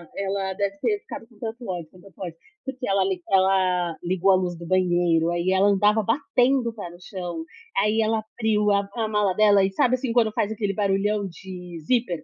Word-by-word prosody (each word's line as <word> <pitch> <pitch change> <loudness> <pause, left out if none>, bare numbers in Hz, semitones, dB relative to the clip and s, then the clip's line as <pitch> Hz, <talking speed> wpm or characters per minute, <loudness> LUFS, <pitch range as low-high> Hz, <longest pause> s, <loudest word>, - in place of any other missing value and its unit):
ela 195 -1 -2
deve 200 0 -2
ter 415 -2 0
ficado 225 - -9
com 225 -4 -23
tanto 230 0 -6
ódio, 170 -4 -4
com 185 - -18
tanto 195 0 -17
ódio, 170 -3 -6 0.3
porque 260 -1 -5
ela 195 -1 +2
li 190 -2 -2
ela 185 -3 +2
ligou 185 +2 +2
a - - +6
luz 180 -2 -1
do 170 - -9
banheiro, 175 -3 +2
aí 175 +2 0
ela 190 +2 +4
andava 210 +2 +3
batendo 250 +1 +1
o - - -8
pé 200 -6 -7
no 175 - -13
chão, 175 -4 -6 0.3
aí 210 +3 +2
ela 220 0 +1
abriu 215 -1 0
a 200 0 +1
a 225 -2 -1
mala 210 -3 +1
dela 205 -1 +5
e, 190 - +1
sabe, 245 +6 +2
assim, 250 -2 -3
quando 225 -3 +3
faz 210 - 0
aquele 205 -2 -2
barulhão 200 +1 0
de 180 -1 -9
zíper? 180 -5 0
195 Hz, 210 wpm, -24 LUFS, 180-220 Hz, 0.3 s, a